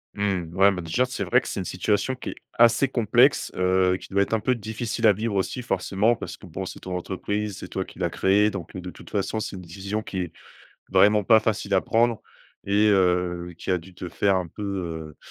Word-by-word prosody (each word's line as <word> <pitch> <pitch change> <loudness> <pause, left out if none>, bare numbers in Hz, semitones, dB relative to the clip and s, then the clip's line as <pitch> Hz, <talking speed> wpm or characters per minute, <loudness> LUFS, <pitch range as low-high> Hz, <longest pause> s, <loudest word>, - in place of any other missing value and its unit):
Mmh, 95 -5 -2
ouais, 100 +1 +6
mais 90 -2 -4
déjà, 85 +10 +1
c'est 125 - -4
vrai - - +4
que - - -9
c'est - - -3
une 90 - -4
situation 105 +7 0
qui - - -7
est - - -6 0.2
assez 120 +3 +5
complexe. 120 -5 +3
Heu, 90 0 +2
qui - - -12
doit 100 +1 +3
être 110 - -5
un 110 - +3
peu 125 +3 +1
difficile 110 +1 -3
à 105 - +7
vivre 105 +1 -3
aussi. 100 +6 -1
Forcément, 100 +1 +1
parce 90 -3 -7
que 95 - -14
bon, 95 +3 -5
c'est - - -8
ton 90 -1 -4
entreprise, 100 +2 -3
c'est - - -7
toi 95 - -3
qui - - -15
l'a 85 -1 0
créé. 100 +5 +3
Donc 95 -3 -7
heu, 90 - -5
de 90 - -7
toute - - -13
façon, 105 +2 -1
c'est 100 - -5
une 90 - -7
décision 100 +5 -4
qui 95 - -7
est, 90 - -5 0.6
vraiment 100 +2 +5
pas 110 +1 +6
facile 105 -2 -2
à 95 - +4
prendre 115 0 +2 0.5
et 105 +2 +3
heu, 90 -2 +1
qui - - -4
a 90 - +3
dû 90 +2 -15
te 90 - -7
faire 95 +3 +1
un 90 -2 -1
peu, 105 - -10
heu 85 -6 -4
100 Hz, 240 wpm, -25 LUFS, 90-105 Hz, 0.6 s, à